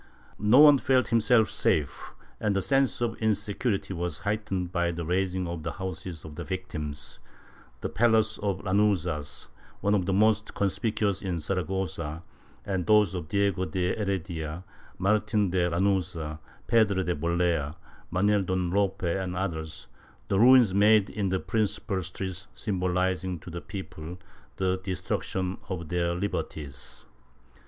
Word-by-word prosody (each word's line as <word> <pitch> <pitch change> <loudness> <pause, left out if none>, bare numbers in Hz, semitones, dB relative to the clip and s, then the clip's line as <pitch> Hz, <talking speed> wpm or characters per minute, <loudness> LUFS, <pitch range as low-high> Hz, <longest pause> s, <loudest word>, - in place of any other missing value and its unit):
No 105 +4 +5
one 145 -2 +8
felt 130 -1 +2
himself 115 -1 +4
safe, 75 -3 0 0.2
and 105 -2 0
the 100 - +2
sense 135 -3 +2
of 120 -1 +1
insecu 105 +1 0
rity 95 - -8
was 85 -2 -2
heightened 100 -4 -2
by 85 -1 +1
the 85 -1 -4
razing 90 +1 0
of 85 -1 -4
the 85 - -4
houses 90 -3 -6
of 80 - -8
the - - -6
victims 75 -6 -5 0.3
— - - -26
the - - -1
palace 110 -2 +2
of 100 -2 -1
the - - -13
Lanuzas, 95 -7 0 0.3
one 100 - +1
of 95 -3 +1
the - - +1
most 110 +2 +2
conspicuous 100 0 0
in 95 -3 -2
Saragossa, 85 -2 -3 0.4
and 95 -3 -2
those 105 -4 +5
of 90 -4 -4
Diego 100 0 +1
de 90 -1 -1
Heredia, 90 -5 -3 0.3
Martin 105 0 +1
de 90 -1 +2
Lanuza, 85 -4 -1 0.3
Pedro 105 -5 +3
de 90 -1 -1
Bolea, 85 -1 0 0.3
Manuel 100 +3 +2
Don 95 -1 -1
Lope 100 0 0
and 90 +1 -1
others 80 -7 -4 0.2
— - - -29
the 95 - +2
ruins 120 -4 +7
made 105 0 +5
in 100 -3 -1
the 95 0 0
principal 100 -3 0
streets 95 +1 -4
symbolizing 90 -1 -1
to 90 - -10
the 85 +1 -5
people 90 -4 -7 0.4
the 95 -1 0
destruction 95 0 -2
of 85 -4 -4
their 85 -1 0
liberties. 75 -8 -5
95 Hz, 150 wpm, -28 LUFS, 85-105 Hz, 0.4 s, one